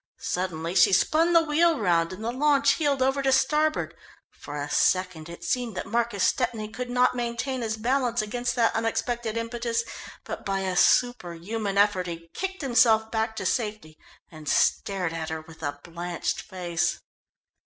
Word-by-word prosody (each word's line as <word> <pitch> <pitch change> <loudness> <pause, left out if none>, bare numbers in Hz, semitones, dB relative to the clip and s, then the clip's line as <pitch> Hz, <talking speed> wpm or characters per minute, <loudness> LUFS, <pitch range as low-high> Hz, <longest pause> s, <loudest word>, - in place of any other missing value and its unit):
Suddenly 170 -2 -3
she 185 +1 +5
spun 320 - +3
the 335 -1 +6
wheel 325 +1 +3
round 170 -5 +1
and 185 +4 -8
the 235 - 0
launch 280 +2 +3
heeled 285 -4 +1
over 270 +1 +1
to 270 -1 +2
starboard. 305 +3 +2 0.4
For 145 - -9
a 145 - -3
second 185 0 +1
it 170 0 -10
seemed 230 +2 -2
that - - -3
Marcus 230 -2 0
Stepney 230 -4 0
could 245 +3 -6
not 250 0 +3
maintain 240 +2 -2
his 220 -1 -2
balance 245 +1 0
against 245 +3 -2
that 230 -2 +2
unexpected 225 0 -1
impetus, 230 0 -2 0.4
but - - -6
by 195 -1 -1
a 185 -1 -2
superhuman 200 -1 +1
effort 200 -3 +3
he 165 -1 -7
kicked 380 -3 -4
himself 230 -4 +4
back 220 0 -1
to - - -4
safety, 210 -9 -2 0.4
and 155 -2 -7
stared 185 -4 +1
at 160 -1 -4
her 160 0 -4
with 160 +1 -15
a 145 -1 -4
blanched 170 0 -3
face. 175 -3 -2
220 Hz, 165 wpm, -26 LUFS, 180-245 Hz, 0.4 s, the